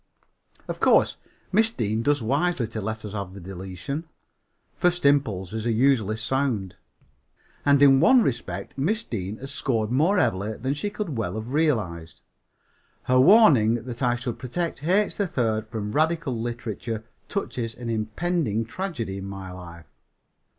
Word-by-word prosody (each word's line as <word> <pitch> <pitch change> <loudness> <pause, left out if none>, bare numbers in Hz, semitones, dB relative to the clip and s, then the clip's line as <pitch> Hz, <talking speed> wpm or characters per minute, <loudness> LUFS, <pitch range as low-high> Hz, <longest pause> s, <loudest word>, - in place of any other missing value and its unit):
Of - - -5
course, - - +4 0.3
Miss 220 +3 +4
Deane 110 - -1
does 145 +1 +1
wisely 140 +3 +1
to 110 - -4
let 110 +2 -4
us 105 - -7
have 100 -2 -5
the - - -8
deletion. 95 - -6 0.7
First 175 -2 +1
impulses 110 -6 +1
are - - +2
usually 115 -3 +2
sound. 115 -5 -1 0.9
And 140 -1 +6
in 135 -1 +7
one 255 - +6
respect 120 - -3
Miss 215 +11 0
Deane 105 - -4
has 135 +1 -7
scored 115 -6 -1
more 160 +11 +3
heavily 100 - +1
than 130 +3 -1
she 150 +8 -3
could 205 - -4
well 110 - -2
have 110 +2 -5
realized. 95 - -1 0.8
Her 130 0 +3
warning 135 - +6
that 120 0 -7
I 120 -2 +2
should 120 -1 -5
protect 145 +5 -3
H. 195 +6 +2
3rd 115 - 0
from 110 -2 -4
radical 155 -1 +1
literature 115 -1 -4 0.3
touches 120 - -3
an 120 -1 -5
impending 115 - -1
tragedy 120 - -4
in 95 - -7
my 95 -1 -7
life. 85 -2 -10
120 Hz, 150 wpm, -25 LUFS, 110-145 Hz, 0.9 s, in